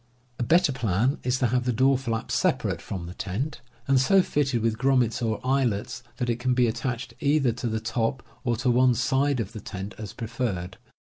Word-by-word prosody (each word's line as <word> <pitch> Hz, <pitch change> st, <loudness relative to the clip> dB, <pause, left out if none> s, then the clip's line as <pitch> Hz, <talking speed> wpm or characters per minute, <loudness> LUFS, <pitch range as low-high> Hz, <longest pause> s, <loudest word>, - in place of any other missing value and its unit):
A -, -, 0 dB
better 170 Hz, +4 st, +4 dB
plan 120 Hz, +2 st, 0 dB
is 125 Hz, +1 st, 0 dB
to 130 Hz, -, +1 dB
have 125 Hz, +1 st, +1 dB
the 125 Hz, -, +2 dB
door 130 Hz, +4 st, +3 dB
flap 115 Hz, -4 st, -3 dB
separate -, -, +1 dB
from 90 Hz, -3 st, -5 dB
the 85 Hz, -, -7 dB
tent, 125 Hz, +13 st, -4 dB, 0.3 s
and 135 Hz, -1 st, +4 dB
so 190 Hz, +7 st, +5 dB
fitted 135 Hz, -8 st, 0 dB
with 115 Hz, -1 st, 0 dB
grommets 125 Hz, -3 st, +2 dB
or 110 Hz, -2 st, 0 dB
eyelets 125 Hz, -4 st, 0 dB, 0.2 s
that 125 Hz, -, -1 dB
it 120 Hz, 0 st, -1 dB
can 125 Hz, 0 st, +1 dB
be 125 Hz, -1 st, +4 dB
attached 120 Hz, +1 st, -3 dB
either 140 Hz, -3 st, +2 dB
to 120 Hz, +1 st, -4 dB
the 110 Hz, -1 st, -1 dB
top 115 Hz, +2 st, -1 dB, 0.2 s
or 120 Hz, -2 st, +1 dB
to 125 Hz, +2 st, +1 dB
one 125 Hz, 0 st, +4 dB
side 135 Hz, +3 st, +1 dB
of 110 Hz, -2 st, -3 dB
the 110 Hz, -3 st, -8 dB
tent, 100 Hz, +2 st, -6 dB
as 105 Hz, -2 st, -6 dB
preferred. 110 Hz, -6 st, -3 dB
120 Hz, 205 wpm, -26 LUFS, 110-130 Hz, 0.3 s, so